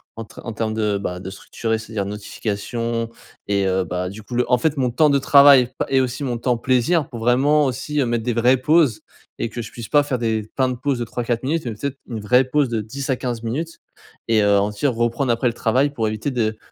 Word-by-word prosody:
en 115 - -6
tre - - -13
en 115 - -5
termes 110 0 -2
de, 105 -2 0
bah, 90 -2 -4
de 95 +1 -7
structurer. 110 +3 -3
C'est-à-dire 110 -2 -4
notifications 115 +3 -3 0.4
et 100 -1 +1
heu, 95 0 +1
bah, 90 +1 -3
du 100 +3 -9
coup 120 - -7
le 125 0 0
en 125 - +6
fait 150 +4 0
mon 130 -2 +1
temps 150 +5 +4
de 140 -1 +3
travail, 140 -2 +6
pa - - -1
et 135 -1 +3
aussi 130 +2 -3
mon 125 -3 -2
temps 120 0 0
plaisir 130 +6 +1
pour 120 - -7
vraiment 135 +6 +3
aussi, 135 +3 -1
mettre 120 -1 -1
des 120 +1 -1
vraies 120 +3 +3
pauses. 145 -3 +3 0.4
Et - - 0
que 120 - -5
je 110 - -9
puisse 115 -2 -8
pas 145 -1 +4
faire 135 -4 -2
des 110 -2 -1
plein 130 -1 +3
de 125 - -2
pauses 130 0 -2
de 120 - -2
3-4 120 +1 -3
minutes 155 +5 -1
mais, 120 - -3
peut-être, 140 +5 -5
une 115 -3 -4
vraie 125 +5 +4
pause 140 +2 +1
de 115 -2 -1
10 135 +6 -6
à 130 - +2
15 120 -2 -4
minutes 150 +9 -4 0.5
et 110 -1 +3
heu, 100 0 +4
en 100 +1 +1
tire, 120 +6 0
reprendre 120 +2 0
après 115 +2 +1
le 120 - 0
travail 130 +5 +1
pour 115 -6 -1
éviter 110 +6 -3
de 110 -4 -1
120 Hz, 250 wpm, -21 LUFS, 110-135 Hz, 0.5 s, en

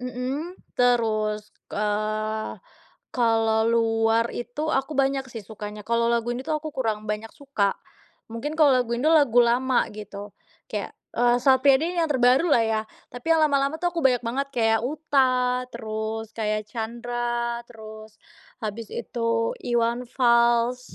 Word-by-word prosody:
Mhm. 260 +8 -4 0.2
Terus, 215 -4 +1 0.2
eee, 215 +1 -2 0.6
kalau 225 -2 +2
luar 225 0 +2
itu 290 +6 -3
aku 270 +2 -1
banyak 270 -1 +1
sih 225 -4 -8
sukanya. 210 0 -8
Kalau 235 0 +1
lagu 235 0 0
ini 245 - -4
tuh 305 +3 -1
aku 310 0 -6
kurang 220 -5 -2
banyak 215 +1 -4
suka. 245 -9 -1 0.6
Mungkin 295 +7 -4
kalau 300 -3 +6
lagu 245 -2 +1
Indo, 300 +6 +2
lagu 280 -7 +4
lama 250 +2 +2
gitu. 205 -1 -9 0.4
Kayak, - - -4 0.2
e 240 - -2 0.2
Sal 265 -1 +5
Priadi 285 +5 +4
ini - - -7
yang 325 - 0
terbaru 260 +4 +4
lah 240 -6 +4
ya. 220 -1 0 0.3
Tapi 245 +5 -7
lama-lama 285 -1 +2
tuh 350 0 +1
aku 335 - -2
banyak 250 -2 +3
banget 270 +4 -2
kayak 225 -2 +2
Utha, 255 -4 +1
terus 220 0 -4
kayak 215 -1 -1
Chandra, 235 0 -3
terus 220 -1 -11 0.5
habis 220 +1 -4
itu 230 -1 -1
Iwan 240 +1 0
Fals. 240 0 +2
235 Hz, 145 wpm, -25 LUFS, 220-260 Hz, 0.6 s, kalau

